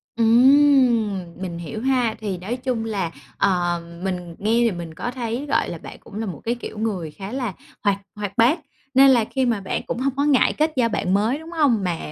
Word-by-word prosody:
Ừm, 240 -2 +5 0.2
mình 175 -3 -4
hiểu 175 +6 -6
ha. 250 -4 +1
Thì 200 -4 -3
nói 205 +8 -4
chung 245 -3 -2
là, 195 -7 -2 0.3
ờ, 175 -2 +1 0.2
mình 180 -3 -4
nghe 210 +2 0
thì 230 - +3
mình 170 -3 -6
có 245 +9 -4
thấy, 245 +1 -3
gọi - - +1
là, - - -5
bạn - - -10
cũng 200 - -14
là 225 - -2
một 185 - -6
cái 235 +2 0
kiểu 235 - -8
người 195 -8 -2
khá 195 +5 -8
là 250 -6 -3 0.3
hoạt 200 -2 +2 0.2
hoạt 205 -1 -5
bát, 250 +9 +4 0.3
nên 270 +1 +7
là 240 -4 +4
khi 265 +3 -1
mà 230 -5 0
bạn 190 - -2
cũng 240 - -3
hông 270 0 -1
có 280 +1 +1
ngại 285 -4 +4
kết 310 +1 +1
giao 240 -3 +2
bạn 190 -3 -1
mới, 220 +7 +2
đúng 320 +1 -11
hông? 285 - +2
Mà 175 -3 -1
225 Hz, 225 wpm, -22 LUFS, 195-255 Hz, 0.3 s, nên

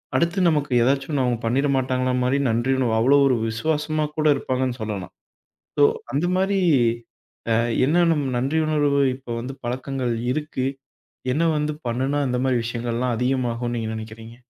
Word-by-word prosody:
அடுத்து 170 +3 +1
நமக்கு 150 -3 0
எதாச்சொன்னு 135 +2 +1
அவங்க 125 -1 0
பண்ணிறமாட்டாங்களா 130 0 +1
மாரி 130 +2 +2
நன்றியுணர்வு 125 +1 +1
அவ்ளோ 135 +5 +5
ஒரு 130 - +3
விசுவாசமா 155 +5 -1
கூட 155 - 0
இருப்பாங்கன்னு 130 -2 -2
சொல்லலாம். 105 -4 -4 0.7
ஸோ 145 - +3 0.3
அந்த 145 +5 0
மாரி 195 +1 +1 0.9
அ - - +4 0.3
என்ன 175 +5 +3
நம் 145 -3 0
நன்றியுணர்வு 145 +1 +1 0.2
இப்போ 130 -2 -12
வந்து 130 +3 -6
பழக்கங்கள் 130 0 -2 0.2
இருக்கு. 150 -3 -3 0.7
என்ன 155 +6 +1
வந்து 150 0 -1 0.2
பண்ணுனா 130 +5 -1
இந்த 125 0 -1
மாதிரி 130 -2 +2
விஷயங்கள்லாம் 120 +1 -2
அதிகமாகும்னு 120 -1 -1
நீங்க 110 -1 -3
நினைக்கிறீங்க? 110 +1 -9
130 Hz, 135 wpm, -23 LUFS, 120-145 Hz, 0.9 s, அவ்ளோ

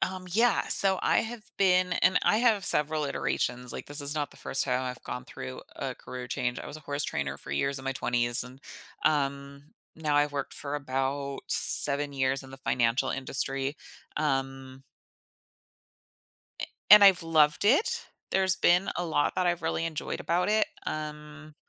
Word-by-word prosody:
Um, 185 0 -3
yeah, 230 +6 +2
so 190 -1 +3
I - - +3
have 225 -1 -7
been 185 -2 +3
and 180 +1 +2
I - - +3
have 220 -4 +2
several 150 0 +3
iterations, 125 -3 -2
like, - - -7
this 145 +1 -2
is 145 +1 -1
not 145 -2 -2
the - - -18
1st - - 0
time 125 -1 0
I've 125 -1 -6
gone 125 - -6
through 65 0 -8
a - - -5
career 125 -1 -8
change. 125 0 -2
I - - -8
was 145 - -8
a - - -12
horse 145 0 -3
trainer 70 -1 -3
for 70 - -11
years 135 - -1
in 130 - -11
my 135 - -1
20s, 120 -1 +2
and, 130 +2 -13 0.4
um, 140 -1 -1 0.2
now 155 -2 -1
I've 145 0 +3
worked 140 -1 -4
for 145 0 -5
about 140 0 -3
7 145 0 +3
years 135 0 -1
in 135 - -13
the 135 - -10
financial 120 -2 0
industry, 135 +1 0 0.4
um 135 -2 -3 1.8
a - - -3 0.2
and 210 0 +10
I've 190 -3 +6
loved 155 0 +3
it. 280 - +2 0.2
There's 190 0 +2
been 180 +1 +3
a 175 - -2
lot 145 -2 0
that 185 - +1
I've 175 0 0
really 165 - -1
enjoyed 160 -2 -5
about 175 +3 0
it, 215 0 +3 0.2
um, 150 0 -7
145 Hz, 175 wpm, -28 LUFS, 135-175 Hz, 1.8 s, and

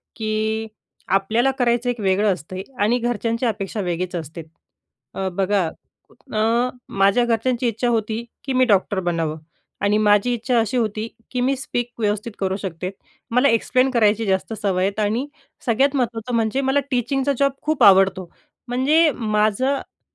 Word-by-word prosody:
की 220 0 -1 0.4
आपल्याला 220 +7 +2
करायचं 240 0 +2
एक 245 -1 -2
वेगळं 200 +1 +2
असतं 180 +2 -8 0.3
आणि 230 +4 +3
घरच्यांची 230 0 -1
अपेक्षा 210 -2 -2
वेगळीच 180 0 -3
असते. 165 0 -6 0.7
अ, 190 - -2
बघा 195 +1 +1
अ, - - -5 0.4
कुठण 230 0 0 0.3
माझ्या 200 +5 +4
घरच्यांची 240 +2 0
इच्छा 230 +2 -1
होती, 225 0 -1 0.2
की 270 - -3
मी 255 0 +4
डॉक्टर 200 -3 +2
बनावं 165 -3 -1 0.5
आणि 205 +1 +3
माझी 210 +3 +3
इच्छा 240 +1 +1
अशी 225 +2 0
होती, 220 -1 -1 0.2
की 250 - -1
मी 265 +2 +2
स्पीक 245 -2 -3
व्यवस्थित 210 +1 -1
करू 190 -1 0
शकते, 185 -2 -5 0.4
मला 250 +4 +4
एक्सप्लेन 255 +3 +2
करायची 220 -2 +2
जास्त 190 +2 0
सवय 195 -4 -1
आहे. 195 - +1
आणि 230 +7 -1 0.4
सगळ्यात 270 +4 +2
महत्त्वाचं 240 -2 -1
म्हणजे 230 +4 +1
मला 270 +1 +2
टीचिंगचा 265 +3 0
जॉब 280 0 +3
खूप 310 0 0
आवडतो. 190 -2 +5 0.4
म्हणजे 295 +6 +3
माझं-माझं 220 +4 -1
225 Hz, 150 wpm, -21 LUFS, 200-245 Hz, 0.7 s, आवडतो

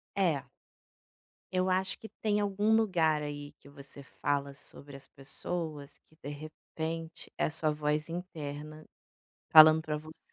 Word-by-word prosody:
É. 165 -8 +1 1.1
Eu 185 +1 +2
acho 185 0 0
que 220 - -10
tem 210 -1 -1
algum 205 +2 +2
lugar, 170 -8 +2
aí 145 0 -6
que - - -16
você 140 0 -11
fala 140 0 -2
sobre 140 0 -12
as 135 0 -10
pessoas, 150 +1 -6
que 155 - -25
de 145 - -11
repente 160 +2 -6
é - - +2
a - - 0
sua 160 -1 0
voz 150 +1 -1
interna 155 -3 -6 0.7
falando 155 0 +9
pra 155 -1 -3
você. 155 +1 -11
155 Hz, 145 wpm, -31 LUFS, 145-175 Hz, 1.1 s, falando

